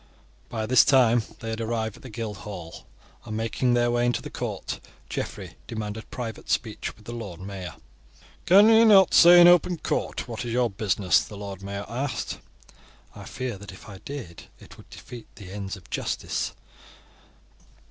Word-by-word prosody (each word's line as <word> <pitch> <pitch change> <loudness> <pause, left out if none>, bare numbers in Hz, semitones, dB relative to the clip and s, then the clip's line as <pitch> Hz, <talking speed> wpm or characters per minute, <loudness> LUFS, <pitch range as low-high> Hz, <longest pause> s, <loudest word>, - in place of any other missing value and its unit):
By 110 -2 -3
this 125 +3 +6
time 120 -3 +4 0.2
they 115 - -4
had 110 +1 -4
arrived 110 -1 -2
at - - -16
the 130 - -10
Guildhall, 105 -6 -7 0.4
and 110 - -5
making 120 +2 0
their 120 0 +2
way 120 0 +1
into 120 0 0
the - - -8
court, - - -4 0.3
Geoffrey - - -5
demanded 110 -1 -6
private 115 -3 -6
speech 110 -2 -2
with 105 - -20
the 120 - -7
Lord 105 -8 -7
Mayor. 95 -2 -7 0.7
"Can 200 +4 +8
you 225 0 +7
not 200 -5 +6
say 175 +1 +9
in 175 - +9
open 175 0 +5
court 155 - -2
what 115 -1 -5
is 120 -1 -4
you 125 0 +2
business?" 100 -3 +2
the 105 - -9
Lord 100 -1 -7
Mayor 100 +1 -5
asked. 130 +4 -3 0.8
"I - - -10
fear 130 -6 -5
that 100 0 -10
if 95 - -14
I 100 -3 -10
did 125 -12 -8
it - - -14
would - - -17
defeat 120 -2 -11
the 95 -3 -11
ends 100 0 -5
of 90 - -17
justice." - - -2
115 Hz, 175 wpm, -25 LUFS, 100-125 Hz, 0.8 s, say